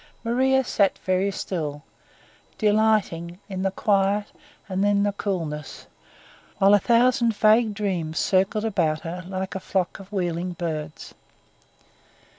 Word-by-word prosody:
Maria 265 Hz, +3 st, +2 dB
sat 200 Hz, -5 st, +1 dB
very 185 Hz, +1 st, +1 dB
still, 155 Hz, -7 st, -4 dB, 0.7 s
delighting 210 Hz, -6 st, +1 dB
in 190 Hz, -2 st, -5 dB
the 195 Hz, -, +1 dB
quiet 200 Hz, +1 st, +1 dB, 0.4 s
and 190 Hz, 0 st, -1 dB, 0.2 s
the 205 Hz, -, +1 dB
coolness, 165 Hz, -8 st, -4 dB, 0.7 s
while 195 Hz, +1 st, +5 dB
a 205 Hz, -, +6 dB
thousand 235 Hz, 0 st, +3 dB
vague 215 Hz, 0 st, +4 dB
dreams 175 Hz, -6 st, -2 dB
circled 195 Hz, +3 st, +1 dB
about 165 Hz, -8 st, 0 dB
her 175 Hz, +2 st, -6 dB
like 190 Hz, 0 st, -4 dB
a 190 Hz, -, -3 dB
flock 185 Hz, -1 st, -2 dB
of 195 Hz, 0 st, -13 dB
wheeling 180 Hz, -2 st, -2 dB
birds. 155 Hz, -3 st, -5 dB
195 Hz, 120 wpm, -24 LUFS, 175-210 Hz, 0.7 s, a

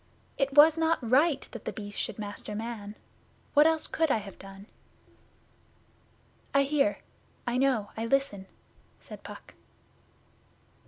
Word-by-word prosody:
It 275 Hz, -1 st, -1 dB
was 310 Hz, +2 st, +7 dB
not 325 Hz, 0 st, +3 dB
right 280 Hz, +6 st, +3 dB
that -, -, -9 dB
The -, -, -2 dB
Beast 205 Hz, -1 st, -6 dB
should -, -, -4 dB
master 210 Hz, 0 st, -6 dB
man. 215 Hz, -2 st, -6 dB, 0.6 s
What 295 Hz, +2 st, +7 dB
else 320 Hz, -1 st, +1 dB
could 320 Hz, -1 st, 0 dB
I -, -, +3 dB
have 200 Hz, -2 st, -9 dB
done?' 195 Hz, 0 st, -11 dB, 1.9 s
'I 275 Hz, -, +6 dB
hear. 290 Hz, +1 st, +1 dB, 0.5 s
I 245 Hz, +1 st, 0 dB
know. 255 Hz, -7 st, +1 dB
I 225 Hz, +1 st, -3 dB
listen,' 230 Hz, -7 st, 0 dB, 0.5 s
said -, -, -11 dB
Puck. -, -, -11 dB
255 Hz, 130 wpm, -29 LUFS, 210-295 Hz, 1.9 s, was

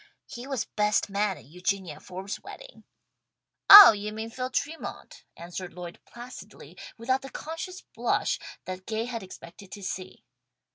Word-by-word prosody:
He 240 Hz, +2 st, -9 dB
was 265 Hz, -5 st, -2 dB
best 210 Hz, -1 st, 0 dB
man 200 Hz, -1 st, 0 dB
at -, -, -16 dB
Eugenia 180 Hz, +2 st, -3 dB
Forbes' 190 Hz, +2 st, -7 dB
wedding." -, -, -12 dB, 0.8 s
"Oh, 405 Hz, -, +13 dB
you 210 Hz, 0 st, -5 dB
mean 220 Hz, +1 st, -6 dB
Phil 255 Hz, +2 st, -4 dB
Tremont!" 300 Hz, +5 st, -5 dB
answered 175 Hz, +1 st, -7 dB
Lloyd 175 Hz, -1 st, -8 dB
placidly, 240 Hz, +1 st, -12 dB, 0.2 s
without 260 Hz, +3 st, 0 dB
the 270 Hz, -, -9 dB
conscious 330 Hz, +6 st, -7 dB
blush -, -, -1 dB, 0.3 s
that 185 Hz, 0 st, -7 dB
Gay 225 Hz, +1 st, -2 dB
had 235 Hz, -2 st, -5 dB
expected 185 Hz, +1 st, -12 dB
to 205 Hz, -, -9 dB
see. 185 Hz, 0 st, -6 dB
210 Hz, 145 wpm, -27 LUFS, 185-255 Hz, 0.8 s, Oh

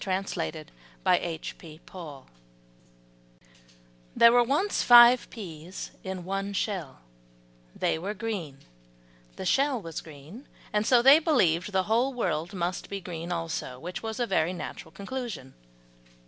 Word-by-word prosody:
THE 185 Hz, -, -3 dB, 0.9 s
PEA 155 Hz, -2 st, -12 dB
BLOSSOM 150 Hz, -7 st, -10 dB, 1.9 s
There 235 Hz, -, +7 dB
were 245 Hz, 0 st, +5 dB
once 295 Hz, -, 0 dB
five 240 Hz, 0 st, +8 dB
peas 180 Hz, -4 st, -8 dB
in 190 Hz, -2 st, -5 dB
one 195 Hz, +2 st, -3 dB
shell, 185 Hz, -, -3 dB, 0.7 s
they -, -, 0 dB
were 200 Hz, +5 st, -4 dB
green, 190 Hz, -10 st, -4 dB, 0.8 s
the -, -, -6 dB
shell 275 Hz, -2 st, +2 dB
was 165 Hz, -5 st, -6 dB
green, 160 Hz, -, -13 dB, 0.3 s
and 210 Hz, 0 st, +1 dB
so 245 Hz, -2 st, +5 dB
they 275 Hz, +4 st, +8 dB
believed 185 Hz, -, +2 dB
that -, -, -9 dB
the 190 Hz, 0 st, +2 dB
whole 240 Hz, +6 st, +1 dB
world 175 Hz, -4 st, -2 dB
must 180 Hz, 0 st, -3 dB
be 200 Hz, -, -4 dB
green 175 Hz, -2 st, -6 dB
also, 165 Hz, -6 st, -4 dB
which 175 Hz, +7 st, -6 dB
was 225 Hz, +1 st, -5 dB
a 240 Hz, -, +1 dB
very 180 Hz, -4 st, +1 dB
natural 165 Hz, -2 st, -7 dB
conclusion. 200 Hz, -, -6 dB
190 Hz, 135 wpm, -27 LUFS, 165-235 Hz, 1.9 s, five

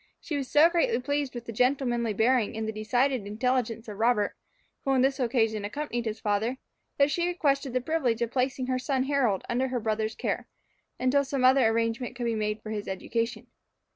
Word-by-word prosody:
She 310 Hz, -, -5 dB
was 275 Hz, -3 st, -3 dB
so 300 Hz, +3 st, +7 dB
greatly 345 Hz, -, +1 dB
pleased 285 Hz, 0 st, -2 dB
with 240 Hz, -1 st, -6 dB
the 230 Hz, -, -5 dB
gentlemanly 240 Hz, -2 st, +1 dB
bearing 225 Hz, 0 st, +2 dB
and 220 Hz, 0 st, -2 dB
the -, -, -1 dB
decided 235 Hz, +2 st, 0 dB
intelligence 230 Hz, +1 st, -1 dB
of 210 Hz, -1 st, -8 dB
Robert, 225 Hz, -3 st, +2 dB, 0.5 s
who -, -, -2 dB
on 265 Hz, -1 st, +3 dB
this 270 Hz, +1 st, +1 dB
occasion 225 Hz, -4 st, +1 dB
accompanied 240 Hz, +2 st, -3 dB
his 220 Hz, 0 st, -3 dB
father, 215 Hz, +5 st, 0 dB, 0.4 s
that 280 Hz, +1 st, +4 dB
she 345 Hz, +2 st, 0 dB
requested 275 Hz, -6 st, 0 dB
the 255 Hz, -, +1 dB
privilege 250 Hz, -5 st, 0 dB
of 235 Hz, -, -3 dB
placing 255 Hz, 0 st, 0 dB
her 255 Hz, 0 st, -1 dB
son 260 Hz, 0 st, 0 dB
Harold 265 Hz, -8 st, +1 dB
under 255 Hz, +2 st, 0 dB
her 250 Hz, -1 st, -2 dB
brother's 220 Hz, 0 st, -1 dB
care, -, -, -2 dB, 0.5 s
until 255 Hz, +3 st, +3 dB
some 270 Hz, -1 st, -2 dB
other 260 Hz, -2 st, +6 dB
arrangement 230 Hz, +2 st, -1 dB
could 245 Hz, -1 st, -3 dB
be 230 Hz, -, +1 dB
made 210 Hz, 0 st, -2 dB
for 215 Hz, -, -6 dB
his 210 Hz, -1 st, -4 dB
education. 230 Hz, +4 st, -3 dB
245 Hz, 200 wpm, -28 LUFS, 220-270 Hz, 0.5 s, so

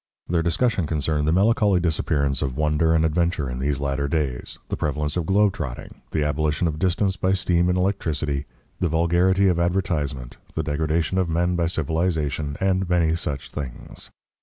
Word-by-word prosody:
Their 85 Hz, -1 st, +1 dB
discussion 90 Hz, +1 st, +1 dB
concerned 75 Hz, -1 st, 0 dB
the -, -, +3 dB
melancholy 100 Hz, +1 st, +3 dB
disappearance 75 Hz, -4 st, 0 dB
of 65 Hz, -2 st, -2 dB
wonder 75 Hz, +2 st, +2 dB
and 80 Hz, 0 st, +3 dB
adventure 80 Hz, -2 st, 0 dB
in 60 Hz, 0 st, -4 dB
these 70 Hz, +1 st, -1 dB
latter 70 Hz, 0 st, -1 dB
days, 70 Hz, -5 st, -2 dB
the -, -, -1 dB
prevalence 75 Hz, 0 st, -2 dB
of 85 Hz, -3 st, -2 dB
globe 100 Hz, 0 st, +3 dB
trotting, 70 Hz, -11 st, -7 dB
the 75 Hz, -, 0 dB
abolition 75 Hz, +3 st, 0 dB
of 75 Hz, -1 st, -3 dB
distance 95 Hz, +2 st, +1 dB
by 95 Hz, 0 st, +1 dB
steam 90 Hz, -2 st, +2 dB
and 90 Hz, -, +1 dB
electricity, 75 Hz, -7 st, -1 dB, 0.3 s
the 90 Hz, -, +1 dB
vulgarity 85 Hz, +4 st, +3 dB
of 90 Hz, -2 st, +2 dB
advertisement, 85 Hz, -8 st, -1 dB, 0.2 s
the 80 Hz, -, -1 dB
degradation 80 Hz, +4 st, 0 dB
of 90 Hz, -2 st, 0 dB
men 85 Hz, +2 st, +1 dB
by 85 Hz, -1 st, +1 dB
civilisation, 80 Hz, -3 st, -1 dB
and 95 Hz, -1 st, +1 dB
many 85 Hz, -3 st, +3 dB
such 75 Hz, -5 st, -4 dB
things. 70 Hz, -5 st, -7 dB
80 Hz, 170 wpm, -23 LUFS, 75-90 Hz, 0.3 s, the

